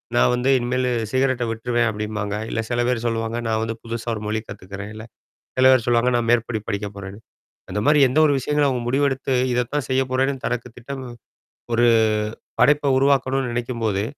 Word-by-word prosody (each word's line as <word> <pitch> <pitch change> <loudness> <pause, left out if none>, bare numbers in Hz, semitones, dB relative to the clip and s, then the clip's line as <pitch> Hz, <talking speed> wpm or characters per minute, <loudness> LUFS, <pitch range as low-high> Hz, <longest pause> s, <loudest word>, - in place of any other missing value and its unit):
நான் 120 - +4
வந்து 125 +2 0
இனிமேலு 125 +1 0 0.2
சிகரெட்ட 130 -1 +1
விட்டுருவேன் 120 +1 0
அப்படிம்பாங்க. 105 -1 -3
இல்ல - - -2
சில 120 0 0
பேர் 125 -2 0
சொல்லுவாங்க, 115 0 -2
நான் 110 0 0
வந்து 115 0 -3
புதுசா 115 0 -6
ஒரு 105 - -6
மொழி 110 +1 -1
கத்துக்கிறேன். 100 +1 -8
இல்ல 110 +1 -8 0.5
சில - - +5
பேர் 130 -4 +3
சொல்லுவாங்க, 120 +1 +3
நான் 120 -1 -1
மேற்படி 115 -1 +1
படிக்க 100 +1 -2
போறேன்னு. 100 0 -8 0.5
அந்த - - -1
மாதிரி 150 +1 +5
எந்த 135 +5 +2
ஒரு 145 - +3
விஷயங்களும் 150 +1 +1
அவங்க 125 -2 -2
முடிவெடுத்து 135 0 0 0.2
இதைத்தான் 125 +2 -1
செய்ய 130 0 +2
போறேன்னு 135 +1 0
தனக்கு 125 0 -2
திட்டம் 130 +2 -7 0.7
ஒரு 120 +1 +4 0.7
படைப்பை 145 -1 +4
உருவாக்கணும்னு 135 -1 +2
நினைக்கும்போது, 115 -4 -1
120 Hz, 170 wpm, -22 LUFS, 110-130 Hz, 0.7 s, சில